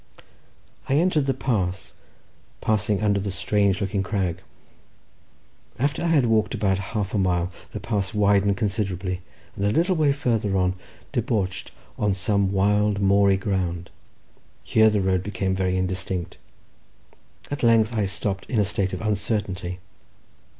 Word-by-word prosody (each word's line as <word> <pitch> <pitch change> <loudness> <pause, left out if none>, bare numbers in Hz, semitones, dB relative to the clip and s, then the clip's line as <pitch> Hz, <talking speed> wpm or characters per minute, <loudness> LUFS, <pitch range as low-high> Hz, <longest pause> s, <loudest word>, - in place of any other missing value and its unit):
I 135 - +3
entered 155 -3 +2
the 135 - +2
pass, 95 -9 -2 0.7
passing 105 -1 0
under 100 -1 +2
the 100 +1 -3
strange 95 +1 +1
looking 100 0 -1
crag. 95 -4 -2 1.4
After 140 +3 0
I 170 - 0
had 155 -6 +3
walked 110 -2 +2
about 95 -2 +1 0.2
half 100 -2 -2
a 105 - +1
mile 90 -1 +1 0.2
the - - -6
pass 100 -4 -1
widened 100 -2 +3
considerably, 95 -3 -2 0.3
and 100 - -4
a 100 - +3
little 170 - +2
way 155 -3 +3
farther 115 -8 0
on 90 0 +2 0.4
debouched 110 -8 -2 0.3
on 105 -2 +1
some 100 +1 +1
wild, 105 +1 +2
moory 100 0 +4
ground. 90 -3 -2 0.7
Here 110 0 +4
the 105 -2 +1
road 95 -1 +1
became 95 -1 -2
very 95 -1 0
indistinct. 95 -1 -3 1.1
At 145 - -3
length 115 -1 +4
I 105 -2 +1
stopped 95 0 -3
in 120 - -1
a 105 - +3
state 95 -1 -1
of - - -4
uncertainty. 100 -4 -2
100 Hz, 145 wpm, -24 LUFS, 95-110 Hz, 1.4 s, moory